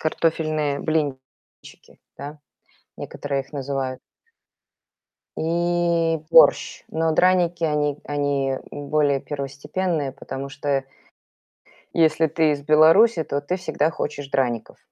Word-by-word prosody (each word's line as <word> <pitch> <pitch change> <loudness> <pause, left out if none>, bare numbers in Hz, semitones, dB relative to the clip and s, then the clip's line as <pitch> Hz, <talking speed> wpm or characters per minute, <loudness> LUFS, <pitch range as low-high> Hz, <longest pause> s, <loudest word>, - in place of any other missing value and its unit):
Картофельные 155 -2 0
блинчики, 145 -5 -5 0.2
да, 145 +2 -8 0.6
некоторые 140 -1 -4
их 135 - -24
называют. 135 -2 -3 1.4
И 170 0 +1
борщ. 165 - +5
Но 160 0 0
драники, 175 0 +2
они 150 -2 0
они, 145 -2 -1 0.2
м, 145 -1 -8
более 145 -2 +2
первостепенные, 145 +3 -3
потому 135 0 -7
что 140 -1 -2 1.1
если 160 0 +3
ты 155 0 +2
из 145 -1 -4
Беларуси, 160 +7 +5
то 140 -1 -2
ты 180 +6 -2
всегда 160 -3 -1
хочешь 145 -3 -5
драников. 125 -4 -2
150 Hz, 105 wpm, -23 LUFS, 140-165 Hz, 1.4 s, борщ